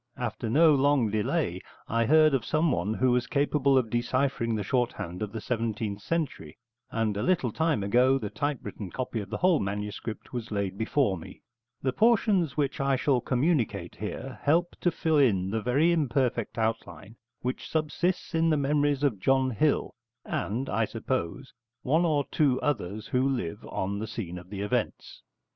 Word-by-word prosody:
After 115 -2 -3
no 155 +6 +6
long 140 -5 +3
delay 105 -1 -1 0.3
I 115 0 +1
heard 155 0 +5
of 130 -4 +1
someone 125 - 0
who 130 +1 +2
was 125 0 +1
capable 140 -1 +2
of 115 -4 +1
deciphering 120 -1 0
the 105 - -2
shorthand 105 -6 -2
of 105 -1 -3
the 110 - -5
seventeenth 110 -3 -2
century, 145 - -3 0.3
and 110 -2 -1
a 100 - -2
little 170 -10 +1
time 160 -5 0
ago 125 +6 +4
the 105 -6 -5
typewritten 120 -9 -4
copy 125 +3 -3
of 100 -2 -6
the - - -3
whole 180 -3 +3
manuscript 105 +4 -5
was 120 -2 -4
laid 100 -3 -2
before 110 - +1
me. - - -12 0.4
The 130 -1 0
portions 205 - +3
which 140 -2 0
I 135 0 +2
shall 130 -1 +1
communicate 120 - 0
here 125 +5 -6
help 170 +4 +2
to 175 - +3
fill 160 -3 +1
in 95 -8 +2
the 110 0 -1
very 140 +9 +3
imperfect 130 -8 0
outline 110 -1 -3 0.3
which 125 +1 -4
subsists 165 +4 -1
in 165 0 +2
the 155 - +3
memories 145 0 +1
of 125 -9 +1
John 130 +4 +2
Hill 140 +7 +1 0.3
and, 120 +7 -2
I 115 +2 +1
suppose, 125 +1 -4 0.3
one 160 +6 +2
or 150 -4 +1
two 140 -5 +2
others 110 -6 -2
who 130 +2 +2
live 120 -12 -3
on 100 +2 -2
the 110 - -4
scene 90 -6 -5
of 90 +1 -15
the 100 -1 -5
events. 105 - -3
125 Hz, 170 wpm, -28 LUFS, 105-145 Hz, 0.4 s, no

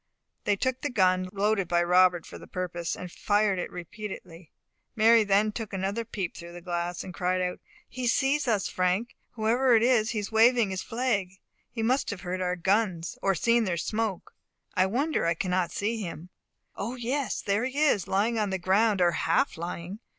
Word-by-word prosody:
They 205 - +3
took 260 +5 -1
the 290 - -1
gun, 185 -5 +2
loaded 200 -1 +1
by 175 0 +2
Robert 180 -1 +4
for - - -10
the - - -12
purpose, 175 -2 -3
and 180 -1 -8
fired 205 -1 +1
it - - -3
repeatedly. 180 -2 -8 0.5
Mary 225 0 +6
then 205 +1 +2
took 215 -1 -6
another 195 +4 -2
peep 195 -6 -4
through 170 0 -10
the 175 - -8
glass, 175 0 -3
and 185 - -8
cried 180 +1 0
out 180 0 -2 0.3
"He 255 0 -4
sees 270 +4 +2
us, 210 -5 +1
Frank, 185 +6 -1 0.2
whoever 235 +3 +3
it 225 - +4
is; 235 -3 +3
he 230 - -3
is 205 0 -3
waving 225 -1 +4
his 190 - -3
flag. 225 -6 -1 0.4
He 225 - -4
must 255 +4 +1
have 205 -4 -5
heard 185 0 -3
our 180 0 0
guns, 185 -2 0
or 195 -1 +2
seen 235 +6 +2
their 180 -3 -1
smoke. 215 +2 -3 0.4
I 185 +1 +3
wonder 270 - 0
I 170 - +2
cannot 180 0 -1
see 220 +4 -2
him. 170 -2 -7 0.5
O, 230 +5 -4
yes, 255 +3 -2
there 205 +4 +1
he 260 +2 -4
is, 290 - +2
lying 220 +4 +1
on 210 -2 0
the 190 - -1
ground, 195 +2 +2
or 175 -1 +5
half 165 0 +1
lying. 170 +4 -6
200 Hz, 195 wpm, -27 LUFS, 180-230 Hz, 0.5 s, Mary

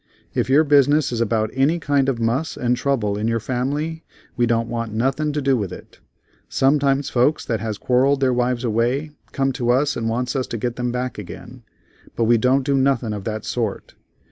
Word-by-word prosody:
If - - -1
your 145 +4 +5
business 145 0 +3
is 120 -1 -1
about 110 -1 0
any 140 +6 +2
kind 145 -4 +1
of 130 - -1
muss 120 +8 -1
and 125 0 +1
trouble 115 -6 -1
in 110 - -1
your 115 0 +1
family 145 +8 -3 0.3
we 120 -1 +2
don't 115 0 +1
want 115 -1 -3
nothin' 135 +7 0
to 150 -1 -2
do 135 -1 +3
with 100 -7 -2
it. - - -12 0.5
Sometimes 140 0 +2
folks 130 +5 +2
that 115 -2 -1
has 110 -1 -4
quarrelled 130 +4 +2
their 130 -2 +2
wives 125 0 0
away 120 +6 0 0.2
come 135 0 0
to 125 -2 -2
us 140 +4 +2
and 115 -1 -2
wants 120 +3 -2
us 130 -2 -1
to 115 - -4
get 120 +2 -3
them 125 0 -2
back 125 -1 -3
again, 120 +5 -10 0.5
but 115 - 0
we 115 0 +4
don't 130 +2 +2
do 140 -1 +1
nothing 130 -5 +1
of 100 -2 -6
that 110 -1 -4
sort. 115 -5 -3
125 Hz, 205 wpm, -21 LUFS, 115-140 Hz, 0.5 s, your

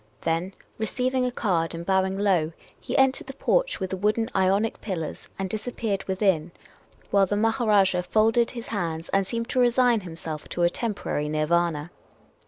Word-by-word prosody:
Then, 170 +4 -1 0.2
receiving 255 +3 0
a - - -2
card 170 -9 0
and 170 +1 -6
bowing 190 0 +1
low, 180 -6 +2 0.3
he - - -3
entered 265 -1 +3
the 270 - -8
porch - - +1
with 190 -2 -3
the 190 - -2
wooden 215 +4 0
Ionic 195 +3 +2
pillars, 170 -7 -5
and 195 - -2
disappeared 215 -1 -3
within, 190 -4 +1 0.6
while 200 -1 +4
the 205 - 0
Maharajah 225 +3 +1
THE 215 - +4
MKSSENGER 190 -2 +4
ENTERED. 180 0 -6
folded 225 +2 +4
his 235 -2 -7
hands 165 -5 -3
and 195 -1 +1
seemed 230 +2 -3
to 255 - +1
resign 245 -1 +4
himself 165 -4 -7
to 175 - -1
a 175 - +5
temporary 200 -10 -2
Nirvana. 155 +1 0
195 Hz, 180 wpm, -25 LUFS, 175-230 Hz, 0.6 s, a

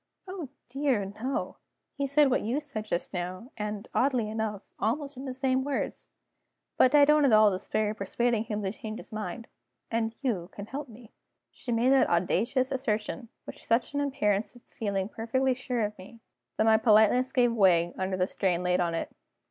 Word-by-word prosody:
"Oh 365 -7 -6 0.2
dear, 265 -5 0 0.2
no! 265 +3 -2 0.4
He 280 -1 -2
said 280 0 +4
what - - +2
you 240 +7 -1
said 275 -8 -4
just 175 -2 -3
now, 185 +7 -5
and 210 0 -4
(oddly 250 -4 +2
enough) 215 -2 -3 0.2
almost 280 +6 -1
in 260 +2 -7
the 260 - -4
same 260 0 +1
words. 280 -1 -3 0.7
But 260 +3 +5
I 290 -1 +8
don't 300 0 +4
at 275 - +4
all 215 -1 +6
despair 210 +3 -1
of 215 - -8
persuading 225 +3 0
him 210 -2 -3
to 190 - -1
change 220 0 -7
his 255 - -12
mind 215 +1 -5 0.5
and 225 0 -1
you 200 -10 -1
can 200 - -7
help 275 +4 -6
me." 225 0 -14 0.4
She 245 - -6
made 235 +3 +3
that 270 - +4
audacious 230 +10 +1
assertion 235 -2 -2 0.2
with - - -9
such 230 +5 0
an 285 - 0
appearance 225 -7 0
of 245 - -17
feeling 200 -3 -3
perfectly 255 +4 0
sure 250 -3 -2
of 210 0 -5
me, 210 +5 -12 0.4
that - - +3
my 220 0 +5
politeness 220 +3 +4
gave 245 -2 +3
way 175 -5 +4
under 190 0 -2
the 180 - +2
strain 180 -2 -1
laid 180 0 +2
on 170 -2 0
it. - - -4
230 Hz, 190 wpm, -28 LUFS, 205-260 Hz, 0.7 s, I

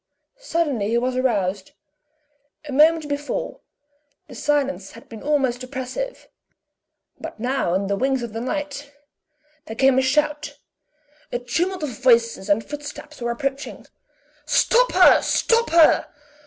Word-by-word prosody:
Suddenly 315 - -1
he 235 - +1
was 250 +1 -1
aroused; 200 -7 -1 0.9
a - - -6
moment 310 +3 +4
before, 285 0 -4 0.7
the - - -12
silence 280 -8 -1
had 230 - -14
been 225 -2 -10
almost 270 -4 0
oppressive 260 - -6 0.9
but - - -8
now 245 -7 -1
on 195 +1 0
the 200 +1 -1
wings 265 +3 0
of 230 -3 -6
the 225 - -4
night, 285 +2 -4 0.8
there 220 - -6
came 265 +2 +4
a - - +3
shout. 295 +3 0 0.7
A - - -1
tumult 335 +9 -2
of 300 - -2
voices 230 -5 +2
and 205 +2 +2
footsteps 295 0 -9
were 235 - -2
approaching. 275 +4 -4 0.6
"Stop - - +3
her! - - +6
Stop 465 0 +1
her!" 330 -1 +5
265 Hz, 135 wpm, -22 LUFS, 235-295 Hz, 0.9 s, her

